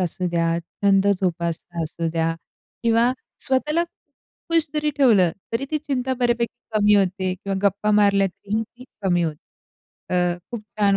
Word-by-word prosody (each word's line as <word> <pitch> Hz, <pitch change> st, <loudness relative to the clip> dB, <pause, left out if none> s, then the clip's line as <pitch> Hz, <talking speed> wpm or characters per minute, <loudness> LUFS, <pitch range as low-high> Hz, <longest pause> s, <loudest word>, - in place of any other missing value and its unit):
असू 180 Hz, 0 st, -1 dB
द्या, 170 Hz, 0 st, +1 dB
छंद 195 Hz, +3 st, +1 dB
जोपासना 170 Hz, -1 st, -2 dB
असू 165 Hz, +1 st, -3 dB
द्या 165 Hz, 0 st, 0 dB, 0.5 s
किंवा 235 Hz, +1 st, +3 dB, 0.3 s
स्वतःला 300 Hz, +6 st, +1 dB, 0.7 s
खुश 330 Hz, -1 st, +3 dB
जरी 300 Hz, 0 st, +1 dB
ठेवलं, 215 Hz, -11 st, +5 dB, 0.2 s
तरी 230 Hz, +4 st, 0 dB
ती 305 Hz, -, +1 dB
चिंता 265 Hz, -3 st, -2 dB
बऱ्यापैकी 240 Hz, -1 st, +1 dB, 0.2 s
कमी 210 Hz, 0 st, +5 dB
होते 190 Hz, -1 st, +1 dB
किंवा 195 Hz, +1 st, -4 dB
गप्पा 205 Hz, +1 st, +2 dB
मारल्या 200 Hz, -1 st, +4 dB
तरीही 210 Hz, +4 st, -3 dB
ती 245 Hz, +3 st, -14 dB, 0.2 s
कमी 175 Hz, -2 st, +2 dB
होते. 155 Hz, -3 st, -2 dB, 0.8 s
अ, 180 Hz, 0 st, +1 dB
खूप 235 Hz, -3 st, -5 dB, 0.2 s
छान 200 Hz, -1 st, +4 dB
200 Hz, 150 wpm, -23 LUFS, 175-240 Hz, 0.8 s, ठेवलं